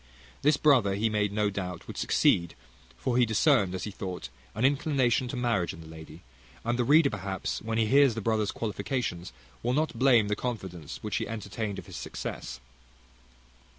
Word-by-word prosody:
This 150 +1 +4
brother 125 -10 +4
he 110 +3 +1
made 105 -1 +1
no 105 0 +1
doubt 90 -3 -5
would - - -8
succeed; 85 -1 +2 0.4
for 120 - -1
he 125 - +5
discerned, 110 - +3
as 90 - -4
he 105 - -4
thought, 90 -9 -6 0.3
an 110 +5 +1
inclination 135 -3 +2
to 125 - -5
marriage 120 -8 0
in - - -11
the - - -12
lady; 80 0 -11 0.4
and 120 +1 0
the - - +3
reader 145 +3 +5
perhaps, 95 -3 -3
when 115 0 -2
he 115 - +3
hears 135 +1 +5
the - - -2
brother's 110 -1 +1
qualifications, 105 - -3 0.3
will 120 +2 0
not 155 +3 +1
blame 125 -5 +5
the 105 - 0
confidence 95 - -5
which - - -1
he - - -2
entertained 105 -1 -4
of - - -7
his - - -9
success. - - -6
110 Hz, 185 wpm, -28 LUFS, 95-125 Hz, 0.4 s, he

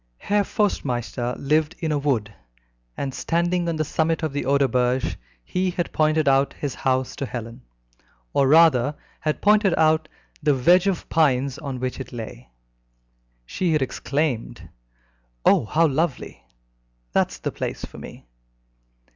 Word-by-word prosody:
Herr 205 0 +1
Forstmeister 125 - -1
lived 155 +3 +1
in 160 -3 -2
a 150 - +1
wood, 120 -8 -1 0.6
and 135 -1 -3
standing 175 +3 0
on 165 - -1
the 155 0 -1
summit 160 +2 0
of 155 -3 -1
the 145 - -2
Oderberge, 130 -2 +1 0.3
he 185 - -1
had 175 -1 -3
pointed 155 0 +2
out 135 0 +3
his 145 -4 -4
house 130 -1 -1
to 140 - -3
Helen, 115 +1 -7 0.7
or 135 - +3
rather, 150 -3 +5 0.2
had 155 -1 -2
pointed 210 -3 +4
out 155 0 +3 0.3
the 150 -2 +3
wedge 175 +9 +4
of 190 -4 -1
pines 135 -4 +2
in 135 -3 -4
which 130 +1 -3
it 130 - -7
lay. 115 - -8 1.0
She 175 - -1
had 150 -3 +2
exclaimed, 140 -2 -2 0.8
"Oh, - - +5
how 165 +9 +2
lovely! 150 - -2 0.7
That's - - +1
the - - -3
place - - -4
for - - -12
me!" - - -11
145 Hz, 145 wpm, -23 LUFS, 130-165 Hz, 1.0 s, rather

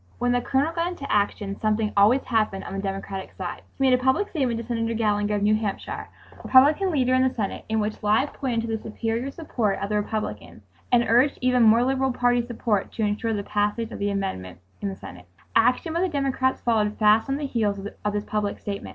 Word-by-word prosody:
When 245 +1 +1
the 245 0 +2
Colonel 275 +6 0
got 335 +1 0
into 350 -6 -6
action 200 -1 0
something 215 0 0
always 215 +7 +5
happened 215 -5 0
on - - -7
the 195 - -3
Democratic 195 -1 -5
side. 180 -2 -5 0.2
He 270 - -1
made 260 -1 +5
a 250 - +3
public 265 +11 +2
statement 255 -8 -1
to 230 - -6
Senator 230 -1 -2
Gallinger 210 -1 +1
of 205 - -1
New 210 +1 +4
Hampshire, 215 -2 -3 0.3
Republican 295 +9 +5
leader 260 -6 +1
in 255 - +4
the 260 0 +3
Senate, 205 -4 -3
in 220 0 +1
which 210 0 -3
lie 215 +6 +3
pointed 255 -5 -2
to 225 -1 -2
the 220 - -6
superior 225 +3 -3
support 240 -10 -2
of 200 - -3
the 210 - +1
Republicans 205 - -4 0.3
and 240 -1 +4
urged 245 +5 +3
even 250 -1 +3
more 230 +1 +6
liberal 265 +1 +1
party 245 -1 +2
support 225 -4 -1
to 225 - -2
ensure 210 +2 -1
the 205 -1 -2
passage 210 +3 -1
of - - -7
the 205 0 0
amendment 140 - -4 0.2
in 200 - -1
the 195 - -6
Senate. 90 0 -11 0.3
Action 250 +8 +3
by 340 - 0
the 375 - +1
Democrats 270 -3 0
followed 215 -3 +1
fast 215 +3 +4
on 270 - 0
the 295 - -3
heels 215 -6 0 0.3
of 210 0 -1
this 205 0 -2
public 210 -1 -2
statement. 200 -1 -6
225 Hz, 220 wpm, -24 LUFS, 205-255 Hz, 0.3 s, more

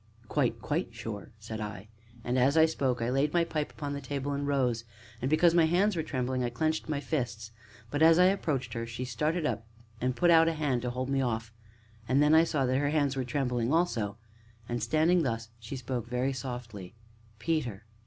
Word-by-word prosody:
"Quite 125 -4 0
quite 160 +5 -1
sure!" 115 -3 -6
said 110 0 -6
I, 105 -1 -6 0.4
and, 125 +2 0
as 135 +5 +3
I 160 - +8
spoke, 130 -7 0
I 120 - 0
laid 140 +3 +1
my 170 - +4
pipe 155 -3 -2
upon 145 -2 -5
the 140 - -4
table 140 +1 -3
and 140 0 -2
rose; 125 -5 +1 0.4
and, 130 - 0
because 165 +2 +4
my 170 -2 +5
hands 185 +5 +2
were 165 - 0
trembling, 130 -4 -2
I 120 - 0
clenched 155 +6 -1
my 150 -2 0
fists. 120 -6 -3 0.4
But, 145 - -1
as 165 0 +7
I 180 - +6
approached 145 - 0
her, 115 -1 -3
she 120 +2 -5
started 150 +7 -1
up 115 -6 -2 0.3
and 125 0 0
put 175 +4 +4
out 165 0 +7
a 165 - +2
hand 145 -6 0
to 125 - -2
hold 130 +2 -3
me 135 -1 +2
off, 110 -3 -2 0.5
and 130 +3 +3
then 150 +1 +5
I 160 +1 +7
saw 145 -5 0
that 130 +1 +1
her 145 0 +1
hands 145 -3 +1
were 130 - -1
trembling 125 -1 -1
also. 120 - +1 0.5
And 120 0 -2
standing 155 +9 +3
thus, 115 -5 -2
she 115 +4 -7
spoke, 125 -2 -4
very 125 +2 0
softly: 120 -8 -7 0.4
"Peter." 120 -7 -2
130 Hz, 210 wpm, -30 LUFS, 120-155 Hz, 0.5 s, I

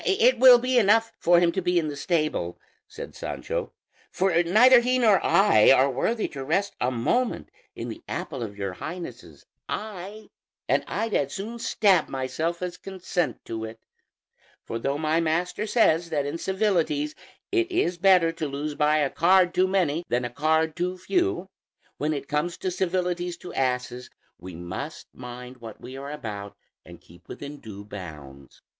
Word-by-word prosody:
"It 255 -10 +3
will 255 -1 +9
be 250 +1 +2
enough 225 +2 +3
for 175 0 +5
him 175 -1 +3
to 190 - -2
be 180 0 +1
in 165 -2 +1
the 145 - -4
stable," 150 - -1 0.3
said - - -9
Sancho, - - -4 0.4
"for 180 -2 +2
neither 230 +9 +6
he 250 +2 +1
nor 220 -6 +4
I 150 - +5
are 135 +1 +5
worthy 220 - -1
to 135 -2 -6
rest 195 +8 0
a 125 - +2
moment 175 - -1 0.3
in - - -5
the - - -8
apple 135 -5 -5
of 105 -3 -6
your 100 -2 -3
Highness's 130 - -8 0.2
eye, 210 0 -6 0.4
and - - +2
I'd 225 -1 -2
as 140 -1 0
soon 225 +4 -6
stab 195 -7 +2
myself 155 +7 -3
as 180 -1 -4
consent 180 -7 -3
to 110 -1 -5
it; 110 0 -8 0.8
for 115 - -5
though 140 +4 -1
my 155 +1 +1
master 175 +6 -1
says 170 -7 +3
that 145 -3 -1
in 145 +4 -4
civilities 170 -7 0 0.4
it 360 -1 +1
is 180 - 0
better 180 -3 +5
to 165 -2 -4
lose 145 +2 -4
by 150 +1 +2
a 145 -2 +1
card 180 +1 +4
too 185 +1 +3
many 175 -4 +1
than 120 +1 0
a 120 - -4
card 160 +3 +1
too 180 +1 -2
few, 350 - 0 0.5
when 150 +2 -1
it 140 -2 -4
comes 150 +4 -1
to 185 - -3
civilities 180 -1 -1
to 175 - -10
asses 125 -1 -2 0.3
we 90 0 -9
must 85 +2 -7
mind 125 0 -9
what 115 -3 -10
we 130 +2 -9
are 140 +1 -7
about 105 -8 -7 0.3
and - - -14
keep 85 +1 -19
within 145 0 -8
due 100 -2 -10
bounds." 75 -9 -11
165 Hz, 175 wpm, -25 LUFS, 130-190 Hz, 0.8 s, will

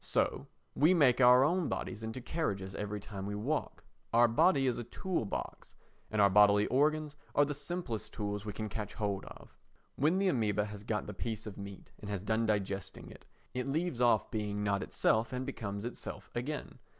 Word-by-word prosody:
So - - 0 0.3
we 160 +6 +4
make 135 -6 +5
our 125 +1 +8
own 170 +2 +1
bodies 110 - -4
into 110 +3 -5
carriages 100 - -2
every 105 +1 -3
time 100 -1 -7
we 105 - -3
walk. 135 +9 -2 0.3
Our 120 +1 +6
body 135 +5 +4
is 125 -2 +1
our - - -3
tool 165 +4 -2
box—and 105 +1 -6
our 100 - +7
bodily 105 +1 +6
organs 150 +2 +1 0.2
are 145 - +5
the 145 - -3
simplest 145 -6 -4
tools 105 -1 -3
we 105 - -4
can 110 +2 -4
catch 105 -1 -5
hold 100 -2 -2
of. - - -13 0.4
When 155 +7 +3
the 195 0 +3
amœba 105 - +1
has 105 -1 -8
got 105 -1 -2
the - - -6
piece 110 -2 -4
of 105 -3 -7
meat 100 -1 -9
and 105 - -8
has 100 -2 -3
done 110 +2 +1
digesting 100 -3 -2
it, - - -14 0.3
it 125 +2 -2
leaves 155 -2 -1
off 120 -1 +3
being 105 -2 -2
not 100 -1 +1
itself 110 +2 +1
and 130 0 -3
becomes 100 -6 -4
itself 105 -5 -7
again. 140 +5 -4
110 Hz, 190 wpm, -33 LUFS, 105-135 Hz, 0.4 s, our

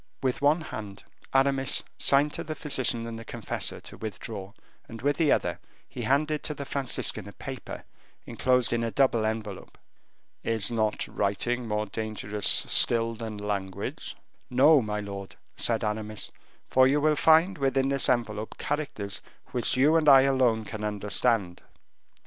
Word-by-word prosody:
With 130 0 0
one 150 +4 +3
hand 105 -9 -8 0.3
Aramis 135 0 +3 0.2
signed 145 +2 +4
to - - -4
the 155 0 -5
physician 130 -5 -1
and 115 -1 -6
the - - -8
confessor 115 0 -4
to - - -9
withdraw, 100 -2 -6 0.4
and 115 - -8
with 145 +1 +1
the 160 -4 +3
other - - 0 0.3
he - - -7
handed 150 +2 +1
to 150 - -3
the 140 - -6
Franciscan 130 -7 -1
a - - -9
paper 135 -2 -8 0.4
enclosed 125 -2 +1
in 115 0 0
a 115 - -1
double 120 -3 +2
envelope. 110 -3 -5 0.7
"Is 110 -2 +1
not 110 -2 0
writing 115 +5 -1
more 105 0 -1
dangerous 105 -1 -2
still 115 -1 +4
than 110 -2 -6
language?" 100 -2 -4 0.3
"No, 140 +4 +5
my 105 -1 -3
lord," 100 -1 -7 0.2
said 115 -2 -1
Aramis, 105 0 -3 0.4
"for 130 0 +5
you 140 +2 +2
will 155 +1 +3
find 160 +4 +4
within 135 0 +1
this 140 -1 +1
envelope 110 -4 -1
characters 140 -9 -3 0.3
which 125 +1 0
you 145 +5 +4
and 155 -2 +4
I 135 -1 +9
alone 130 -5 +2
can 105 0 -7
understand." 105 -2 0
115 Hz, 155 wpm, -27 LUFS, 105-135 Hz, 0.7 s, I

